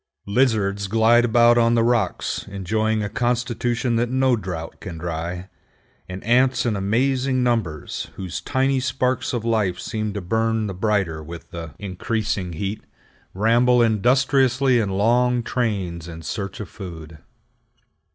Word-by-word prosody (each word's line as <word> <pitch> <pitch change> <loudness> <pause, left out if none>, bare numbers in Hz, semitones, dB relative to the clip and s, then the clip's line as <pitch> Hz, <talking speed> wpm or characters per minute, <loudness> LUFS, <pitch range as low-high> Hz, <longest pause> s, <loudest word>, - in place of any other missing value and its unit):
Lizards 100 -3 +1
glide 115 +3 +4
about 120 +1 +5
on 115 0 +3
the 115 - +3
rocks 115 -6 0
enjoying 110 +3 -1
a - - -1
constitution 120 +1 -1
that 120 +1 0
no 130 0 +3
drought 90 -6 -6
can 90 -5 -7
dry, 85 +2 -4 0.6
and 90 +1 -7
ants 125 +3 +3
in 115 -3 +1
amazing 130 +6 +1
numbers, 110 -11 -2
whose 90 -2 -5
tiny 135 0 +1
sparks 130 -1 -1
of 120 -3 -3
life 110 -6 +1
seem 110 -2 -3
to 100 - -3
burn 110 +3 0
the 100 - -4
brighter 95 -5 0
with 85 +2 -10
the 85 -2 -7
increasing 100 -1 -3
heat, 100 +6 -4 0.5
ramble 120 +4 +4
industriously 130 +3 +3
in 105 -3 0
long 120 +5 +2
trains 95 -10 -2
in 80 -1 -9
search 100 +4 -5
of 105 - -5
food. 80 -5 -9
110 Hz, 140 wpm, -22 LUFS, 95-120 Hz, 0.6 s, about